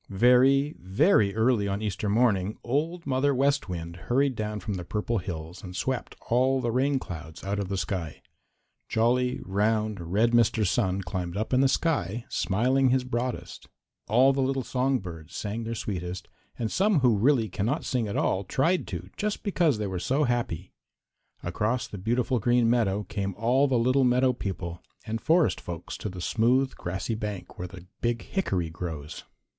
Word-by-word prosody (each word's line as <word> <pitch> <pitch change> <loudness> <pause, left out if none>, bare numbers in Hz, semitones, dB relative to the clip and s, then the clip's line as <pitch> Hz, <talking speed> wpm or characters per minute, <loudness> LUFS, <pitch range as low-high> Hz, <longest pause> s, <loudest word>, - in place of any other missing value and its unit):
Very, 130 +7 +4
very 100 - +3
early 110 -2 +2
on 100 +2 -2
Easter 105 0 -2
morning 105 -3 +2
Old 160 +7 -1
Mother 135 +1 +1
West 140 -2 +1
Wind 85 -1 -5
hurried 130 - +1
down 105 -1 -3
from 105 +2 -4
the 90 -2 -4
Purple 105 +5 -1
Hills 85 -1 -6
and 90 -1 -8
swept 130 +5 -2
all 130 +3 +3
the 120 -2 -1
rain 135 +3 +2
clouds 80 -9 -8
out 100 +1 -2
of 100 -2 -3
the 100 - -1
sky. 90 -4 -4 0.7
Jolly, 125 +3 +2
round, 105 0 0
red 110 +4 +3
Mr. 115 -2 +3
Sun 95 -1 +1
climbed 90 0 -4
up 110 +4 -2
in 130 - +5
the 135 - +5
sky, 120 - 0
smiling 125 +9 +2
his 130 0 +2
broadest. 125 0 -4 0.4
All 130 +6 +5
the 135 - 0
little 135 0 0
song 130 +2 +1
birds 85 -4 -9
sang 110 +2 -3
their 115 +1 -3
sweetest, 90 -4 -4 0.3
and 115 -2 -2
some 195 -5 +3
who 125 -4 +4
really 120 +2 +3
cannot 115 +10 -2
sing 120 -4 0
at 100 - -3
all 95 +1 +1
tried 165 - +1
to 90 0 -5
just 210 0 -2
because 170 - +2
they 105 - -2
were 95 -2 -3
so 135 - +1
happy. 120 - -2 0.7
Across 105 +8 -1
the 100 - -7
beautiful 120 +4 0
Green 120 +1 +3
Meadows 105 -4 +1
came 100 -3 -3
all 125 +6 +3
the 130 -2 +2
little 130 +3 +3
meadow 125 +1 +3
people 95 -6 -5 0.2
and 115 0 -3
forest 165 0 +3
folks 85 -1 -6
to 105 - -4
the 90 -1 -7
smooth, 125 +7 +2
grassy 95 +6 -3
bank 105 -4 -5
where 90 - -3
the 90 0 -12 0.2
big 120 -1 0
hickory 95 - -1
grows. 80 -4 -6
115 Hz, 175 wpm, -27 LUFS, 95-130 Hz, 0.7 s, in